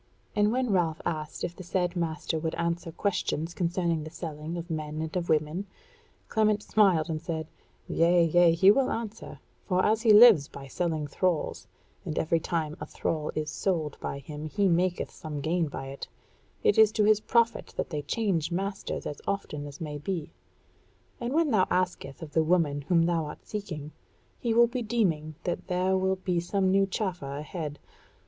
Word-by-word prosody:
And 210 0 +3
when 250 -1 0
Ralph 170 -5 +1
asked 155 -3 -3
if 175 - -3
the - - -9
said 180 0 -1
master 160 -2 -2
would 160 0 -2
answer 170 0 -2
questions 170 -2 -1
concerning 170 -3 0
the 155 - -7
selling 160 0 -6
of 170 0 -6
men 155 -1 -3
and 160 +2 -4
of 175 -1 -2
women, 155 +5 0 0.6
Clement 215 -1 +2
smiled 185 -7 +3
and 155 -2 -3
said: 160 -1 -3 0.4
"Yea, 170 +1 +4
yea, 170 +1 +5
he 190 +4 +7
will 265 +4 +2
answer; 225 -1 -5 0.3
for 185 -1 +2
as 220 +1 +2
he 225 -2 +5
lives 210 -9 +8
by 140 - -10
selling 160 +2 -2
thralls, 170 +3 -1 0.4
and 155 - -4
every 165 +1 +2
time 155 -2 -2
a - - -5
thrall 155 -2 -2
is 155 0 -2
sold 160 -7 -1
by - - -4
him 150 +2 -7
he 200 +5 +1
maketh 180 +1 +1
some 155 -2 -6
gain 165 +3 0
by 135 -2 -6
it, 135 - -7 0.6
it 430 - +4
is 220 -1 +7
to 215 - +2
his 210 0 +5
profit 235 +1 +1
that - - -2
they 150 -2 -2
change 170 0 -1
masters 195 +3 -3
as 145 - -5
often 150 -7 -3
as 140 - -10
may 150 -2 -5
be; 165 0 -4 0.9
and 240 +1 -3
when 315 0 +2
thou 190 -4 +3
askest 175 -6 -1
of 150 -2 -9
the 160 - +3
woman 155 -4 +2
whom 170 -1 +4
thou 165 -2 +1
art 150 - -9
seeking, 165 -8 -5 0.5
he 235 - -1
will 235 +1 +6
be 245 +1 -3
deeming 175 -10 0
that 175 - -3
there 185 +1 +1
will 190 0 +1
be 185 -2 -1
some 185 +2 +1
new 195 0 +3
chaffer 180 -8 -3
ahead. 150 0 -5
170 Hz, 185 wpm, -28 LUFS, 155-195 Hz, 0.9 s, lives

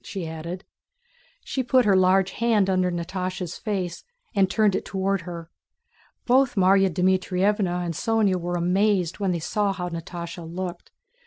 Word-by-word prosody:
she 195 -6 -5
added. 165 +3 -6 0.8
She 265 - -2
put 255 -1 +3
her 200 -2 +4
large 185 +1 +3
hand 215 -4 +2
under 185 -1 +2
Natásha's 180 0 -4
face 185 -5 -3 0.3
and 195 -3 +3
turned 205 0 +2
it - - -2
toward 195 0 -1
her. 170 -1 -8 0.7
Both 260 +1 +3
Márya 195 0 +4
Dmítrievna 185 +1 +1
and 170 - -2
Sónya 215 0 +1
were 175 0 -3
amazed 180 +1 +1
when 195 -2 0
they 175 - 0
saw 200 +5 -1
how 180 -2 -4
Natásha 170 0 -7
looked. 175 0 -6
185 Hz, 150 wpm, -24 LUFS, 175-200 Hz, 0.8 s, her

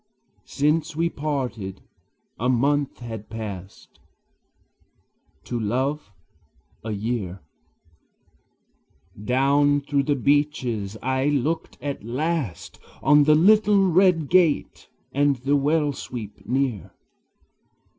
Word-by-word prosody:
Since 150 +2 0
we 165 +2 +1
parted, 125 -10 -4 0.6
a 125 +3 0
month 140 +2 +1
had 110 -3 -7
passed, 100 -4 -8 1.4
To 120 - -4
love, 130 +4 -2 0.7
a 110 - -5
year; 105 -4 -3 1.8
Down 140 +4 +3
through 140 -1 -1
the 145 - +3
beeches 130 -7 0
I 130 +1 0
looked 145 +3 -1
at 140 -7 -4
last 135 - -3 0.2
On 145 +1 +5
the 155 +1 +5
little 205 +3 +5
red 175 -3 +3
gate 170 -3 +1 0.2
and 145 0 +2
the 135 +3 0
well 145 +1 +1
sweep 115 -5 -8
near. 125 -7 -2
140 Hz, 95 wpm, -24 LUFS, 115-150 Hz, 1.8 s, On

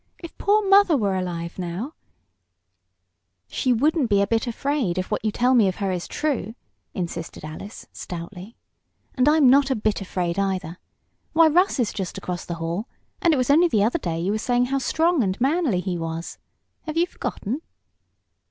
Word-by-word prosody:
If 335 - -10
poor 410 +1 +2
mother 390 -5 +6
were 200 -5 0
alive 175 -1 -4
now 185 - -4 0.8
" - - -50 0.7
"She 255 - 0
wouldn't 285 +2 +2
be 200 -1 +3
a 200 - +3
bit 225 +4 0
afraid, 240 -6 -1
if 185 +2 -3
what 210 - -1
you 215 - +1
tell 250 +4 +2
me 230 -6 +5
of 185 - -1
her 195 -2 -2
is 180 -2 -3
true!" 265 -8 -2 0.4
insisted 170 -4 -5
Alice, 155 +7 -9
stoutly. 180 +5 -8 0.6
"And 255 +2 +3
I'm 305 -3 +5
not 275 +2 +5
a 265 - +1
bit 215 -1 -1
afraid, 180 -1 -2
either. 185 -3 -2 0.5
Why, 325 0 +6
Russ 360 +5 +3
is 235 -4 0
just 190 -4 -4
across 180 -1 -5
the 170 - -4
hall, 170 +7 -3 0.3
and 340 - +4
it 305 - +2
was 255 +1 +2
only 335 +5 +6
the 215 -11 +2
other 240 +10 +1
day 165 - -3
you 180 +4 -1
were 215 - -1
saying 245 +2 +1
how 275 +2 -1
strong 325 +4 +2
and 190 -3 -1
manly 270 - +1
he 180 -2 -3
was. 165 0 -5 0.5
Have 310 +1 -3
you 340 - +4
forgotten?" 270 - -4
220 Hz, 190 wpm, -23 LUFS, 180-285 Hz, 0.8 s, mother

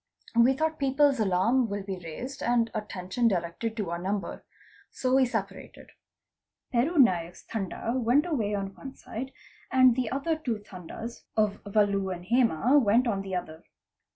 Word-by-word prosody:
We 235 +3 +6
thought 315 +3 -1
people's 275 -1 +3
alarm 220 +5 +2
will 200 0 -3
be 190 -2 -5
raised 250 - -7
and 235 -1 +1
_ - - -14
attention 210 +2 -1
directed 195 +4 -2
to 200 -6 -2
our 170 - -2
number. 195 +2 -3 0.5
So 255 -1 -1
we 265 -1 +5
separated. 220 -5 -6 0.8
Peru 265 +8 +1
Naik's 180 - +3
Tanda 220 +2 -3
went 255 +5 +3
away 225 -12 -1
on 195 -1 -4
one 270 +6 -10
side 260 +4 -7 0.4
and 255 -2 +6
the 250 -3 -1
other 280 +6 -1
two 265 -8 -3
Tandas 205 +4 -9
of 210 -2 +1
Valu 200 -2 +1
and' 175 -1 -6
Hema 245 - +3
went 230 +4 +4
on 200 -4 0
the 195 -1 -4
other. 160 -3 -5
225 Hz, 160 wpm, -28 LUFS, 195-255 Hz, 0.8 s, We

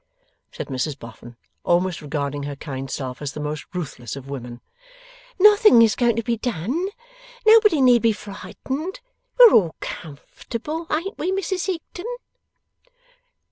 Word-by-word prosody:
said - - -6
Mrs 135 +2 -2
Boffin, 115 +1 -12 0.3
almost 175 0 +1
regarding 145 -1 -3
her 140 0 -5
kind 135 -2 -6
self 130 -1 -5
as 145 -1 -4
the - - -7
most 150 0 -4
ruthless 140 - -6
of 135 -1 -9
women. 120 -3 -7 0.8
'Nothing 415 - +7
is 220 -2 +3
going 240 -3 +2
to 230 - -1
be 230 +1 -1
done. 245 - -2 0.6
Nobody 430 - +6
need 245 -2 +5
be 230 - +4
frightened. 265 - -6 0.4
We're 485 -3 +9
all 170 -6 +4
comfortable; 240 - -7
ain't 335 +7 -2
we, 360 - -1
Mrs 380 -1 -2
Higden? 360 +2 -5
210 Hz, 140 wpm, -22 LUFS, -, 0.8 s, We're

